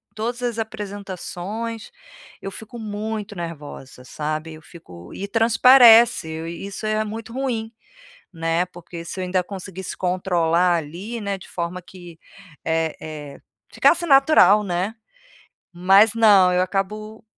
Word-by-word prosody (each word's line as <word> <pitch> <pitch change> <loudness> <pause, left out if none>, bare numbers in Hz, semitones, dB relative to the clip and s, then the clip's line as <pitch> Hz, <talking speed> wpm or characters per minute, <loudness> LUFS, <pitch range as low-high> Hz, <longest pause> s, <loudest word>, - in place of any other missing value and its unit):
todas 235 +3 -4
as 235 -2 -2
apresentações, 210 +1 -6 0.5
eu 195 - -6
fico 220 +4 -10
muito 215 0 -5
nervosa, 150 -7 -8
sabe. 155 +3 -4
Eu 155 - -12
fico 90 - -14
e 200 - -5
transparece, 230 -2 +6 0.2
isso 195 +5 -7
é 215 0 0
muito 225 +2 -7
ruim, 240 -4 -3 0.6
né, 165 +1 -1
porque, 175 -1 -10
se 185 +2 -6
eu - - -2
ainda 180 0 0
conseguisse 190 -1 -7
controlar 180 -1 +1
ali, 180 +9 -6
né, 200 -1 -3
de 190 - -14
forma 175 +1 -4
que, 175 -2 -13 0.5
eh 160 -1 -1
eh, 150 -3 -9 0.3
ficasse 345 0 +3
natural, 270 - +5
né. 185 +3 -2 0.8
Mas 195 +5 +4
não, 205 -5 +6
eu 180 - +2
acabo 215 +4 -4
195 Hz, 130 wpm, -22 LUFS, 170-220 Hz, 0.8 s, transparece